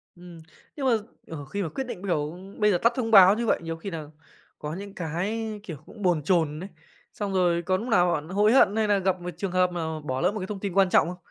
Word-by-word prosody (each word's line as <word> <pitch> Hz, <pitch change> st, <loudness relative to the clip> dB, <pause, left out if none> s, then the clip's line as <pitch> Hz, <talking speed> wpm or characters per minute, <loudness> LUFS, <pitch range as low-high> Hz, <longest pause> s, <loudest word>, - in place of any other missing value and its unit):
Ừm, 175 Hz, -2 st, -13 dB, 0.3 s
nhưng 280 Hz, -, -4 dB
mà, 260 Hz, -, +4 dB, 0.4 s
ờ, 145 Hz, -3 st, -7 dB
khi 200 Hz, +9 st, -4 dB
mà 165 Hz, -, -3 dB
quyết 270 Hz, -, -4 dB
định, 245 Hz, -8 st, -7 dB
kiểu, 155 Hz, -2 st, -2 dB, 0.2 s
bây 210 Hz, -1 st, +4 dB
giờ 180 Hz, -, +3 dB
tắt 235 Hz, +6 st, +2 dB
thông 230 Hz, -3 st, -2 dB
báo 195 Hz, -1 st, +8 dB
như 235 Hz, -, -1 dB
vậy, -, -, +2 dB
nhiều 165 Hz, 0 st, -4 dB
khi 180 Hz, +5 st, -6 dB
nà 165 Hz, -4 st, -6 dB, 0.5 s
có 150 Hz, 0 st, -5 dB
những 200 Hz, +3 st, -8 dB
cái, 205 Hz, +7 st, -3 dB
kiểu, 165 Hz, -7 st, -7 dB
cũng 215 Hz, -, -13 dB
bồn 175 Hz, -6 st, +1 dB
chồn 160 Hz, -3 st, +1 dB
ấy, 190 Hz, +3 st, -7 dB, 0.4 s
xong 200 Hz, -2 st, -4 dB
rồi 175 Hz, -2 st, +2 dB
có 185 Hz, +2 st, 0 dB
núc 225 Hz, +6 st, -6 dB
nào 180 Hz, -7 st, +3 dB
bạn 155 Hz, +1 st, -4 dB
hối 205 Hz, +3 st, +3 dB
hận 215 Hz, -6 st, +5 dB
hay 220 Hz, -1 st, +1 dB
nà 205 Hz, -1 st, +3 dB
gặp 190 Hz, -1 st, 0 dB
một 175 Hz, -, -5 dB
trường 190 Hz, +1 st, -3 dB
hợp 185 Hz, 0 st, +2 dB
mà 160 Hz, -2 st, -3 dB
bỏ 130 Hz, -3 st, -3 dB
lỡ 180 Hz, -, +2 dB
một 215 Hz, -, -5 dB
cái 185 Hz, -, -5 dB
thông 205 Hz, -1 st, -5 dB
tin 195 Hz, -2 st, -4 dB
quan 195 Hz, 0 st, +4 dB
trọng 165 Hz, -, +4 dB
không? 180 Hz, +1 st, -6 dB
185 Hz, 270 wpm, -26 LUFS, 165-205 Hz, 0.5 s, báo